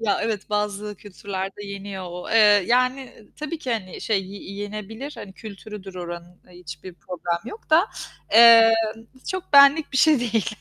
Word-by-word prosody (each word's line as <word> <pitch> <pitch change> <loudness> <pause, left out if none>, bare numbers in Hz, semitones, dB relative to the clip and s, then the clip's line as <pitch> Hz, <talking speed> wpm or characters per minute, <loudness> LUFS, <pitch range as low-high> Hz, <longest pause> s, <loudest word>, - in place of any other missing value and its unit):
Ya, 210 -3 0
evet, 215 -2 -4
bazı 210 0 -3
kültürlerde 195 0 -7
yeniyor 200 -1 -7
o, 180 +1 -8
eee, 225 - +4 0.3
yani, 255 +1 0 0.3
tabii 305 +2 -5
ki, 260 -5 -3
hani, 190 -5 -5
şey, 200 -4 -1
y 195 0 -10
yenebilir, 215 +7 -7
hani, 190 - -10
kültürüdür 200 -2 -10
oranın 175 0 -9
hiçbir 175 0 -11
problem 175 -1 -4
yok 430 - -13
da, 335 +6 +5 0.5
eee, 230 0 +8 0.6
çok 370 -3 -6
benlik 280 +2 +6
bir - - -1
şey 300 -2 +4
değil. 225 -4 -1
210 Hz, 155 wpm, -23 LUFS, 190-240 Hz, 0.6 s, eee